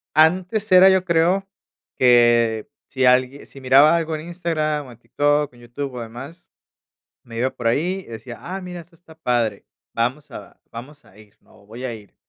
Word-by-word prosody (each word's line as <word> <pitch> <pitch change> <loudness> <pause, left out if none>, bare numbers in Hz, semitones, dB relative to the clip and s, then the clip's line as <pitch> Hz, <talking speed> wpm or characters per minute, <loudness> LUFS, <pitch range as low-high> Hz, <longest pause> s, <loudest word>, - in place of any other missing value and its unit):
Antes 185 +7 +2
era 185 +1 +8
yo 190 -1 +2
creo 175 +3 +1 0.5
que 120 -3 +3 0.2
si 130 -2 -1
alguie 130 +2 +2
si 135 - -13
miraba 140 +5 +5
algo 165 -1 -2
en 155 - -6
Instagram 155 -4 -2
o 125 - -12
en 120 - -16
TikTok, 145 +3 0
en 120 - -18
YouTube 135 +4 -6
o 125 - -5
demás, 135 +10 -10 0.8
me 115 -1 -10
iba 125 +3 +1
por 120 -2 -5
ahí 180 +10 -1
y - - -15
decía 115 +1 -9
"ah, 190 +2 -7
mira, 180 -1 -8
eso 170 +1 -15
está 160 -1 -19
padre, 120 -9 -1 0.3
vamos 130 +5 -2
a - - -11
vamos 135 +6 -11
a 95 - -22
ir, 105 -1 -19
¿no?", - - -23
o - - -23
"voy 115 +5 -10
a 125 -2 -3
ir", 105 -3 -14
140 Hz, 195 wpm, -21 LUFS, 120-170 Hz, 0.8 s, era